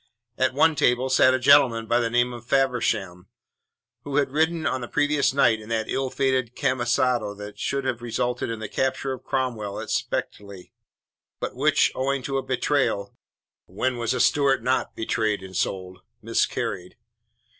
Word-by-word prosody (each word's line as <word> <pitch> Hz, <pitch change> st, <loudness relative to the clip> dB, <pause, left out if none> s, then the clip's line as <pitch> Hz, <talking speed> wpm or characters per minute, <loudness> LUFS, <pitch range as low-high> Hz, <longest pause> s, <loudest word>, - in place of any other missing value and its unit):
At 130 Hz, +1 st, 0 dB
one 160 Hz, +3 st, +4 dB
table 125 Hz, -2 st, +1 dB
sat 130 Hz, 0 st, +5 dB
a -, -, -1 dB
gentleman 130 Hz, -4 st, +5 dB
of 120 Hz, +1 st, +4 dB
the 115 Hz, -, 0 dB
name 120 Hz, +1 st, +1 dB
of 120 Hz, 0 st, -10 dB
Faversham, 120 Hz, -9 st, 0 dB, 0.8 s
who 140 Hz, -1 st, -5 dB
had 140 Hz, -2 st, +1 dB
ridden 160 Hz, +2 st, 0 dB
on 130 Hz, -, -1 dB
the 120 Hz, -, -5 dB
previous 145 Hz, 0 st, +1 dB
night 120 Hz, -5 st, +3 dB
in 105 Hz, -, -12 dB
that 110 Hz, -1 st, -1 dB
ill 135 Hz, -1 st, -1 dB
fated 130 Hz, -3 st, -1 dB
camisado 120 Hz, -4 st, 0 dB
that 105 Hz, 0 st, -10 dB
should 140 Hz, 0 st, -2 dB
have 125 Hz, -3 st, -2 dB
resulted 120 Hz, +1 st, -2 dB
in 115 Hz, -, -3 dB
the 110 Hz, -, -5 dB
capture 130 Hz, +3 st, -1 dB
of 130 Hz, -, -9 dB
Cromwell 115 Hz, -6 st, -3 dB
at -, -, -6 dB
Spetchley, 100 Hz, -3 st, -4 dB, 0.7 s
but -, -, -4 dB
which, -, -, +3 dB
owing 135 Hz, 0 st, -1 dB
to 135 Hz, +1 st, -1 dB
a -, -, -5 dB
betrayal 130 Hz, -6 st, -1 dB, 0.5 s
when 125 Hz, +8 st, -2 dB
was 120 Hz, +1 st, -1 dB
a -, -, -2 dB
Stuart 135 Hz, -1 st, +3 dB
not 130 Hz, +1 st, 0 dB
betrayed 110 Hz, -2 st, -1 dB
and 95 Hz, 0 st, -10 dB
sold? 95 Hz, 0 st, -3 dB, 0.2 s
miscarried. 90 Hz, 0 st, -2 dB
125 Hz, 165 wpm, -24 LUFS, 110-135 Hz, 0.8 s, sat